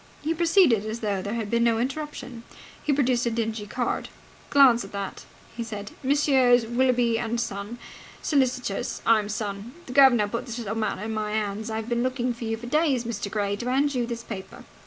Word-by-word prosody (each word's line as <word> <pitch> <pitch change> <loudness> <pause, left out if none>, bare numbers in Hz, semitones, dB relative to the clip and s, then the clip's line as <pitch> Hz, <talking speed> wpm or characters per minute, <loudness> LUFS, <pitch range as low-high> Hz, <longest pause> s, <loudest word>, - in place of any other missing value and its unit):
He 315 +2 +1
proceeded 330 - +4
as 220 +2 -5
though 200 -3 -1
there 205 +4 -3
had 220 -3 -3
been 235 0 +3
no 230 -1 +3
interruption. 265 -1 -4 0.4
He 300 - +1
produced 255 -4 +2
a - - +3
dingy 225 -2 -2
card. 245 +3 -2 0.4
"Glance 260 -5 +6
at 195 - -10
that," 200 -1 -5 0.3
he 235 - -3
said. 210 -2 -7
"Messrs. 260 -4 +4
Willoughby 240 -1 +2
and 235 0 -2
Son, 205 0 -4 0.4
Solicitors. 250 -7 -1
I'm 215 -2 +3
son. 210 +1 -4
The 250 - -7
guv'nor 255 -6 +6
put 235 +5 -4
this 235 -1 -5
little 220 -3 -3
matter 220 -3 -2
into 220 +1 -3
my 215 -1 -2
hands. 215 +1 -2
I've 220 0 -3
been 240 0 0
looking 255 -1 0
for 235 0 -7
you 225 0 -2
for 235 - -9
days, 280 -2 +2
Mr. 215 -4 -4
Gray, 200 -1 -1
to 240 +3 -3
hand 280 +3 +2
you 245 -2 -1
this 235 -1 -5
paper." 195 -5 -8
235 Hz, 200 wpm, -26 LUFS, 215-255 Hz, 0.4 s, Glance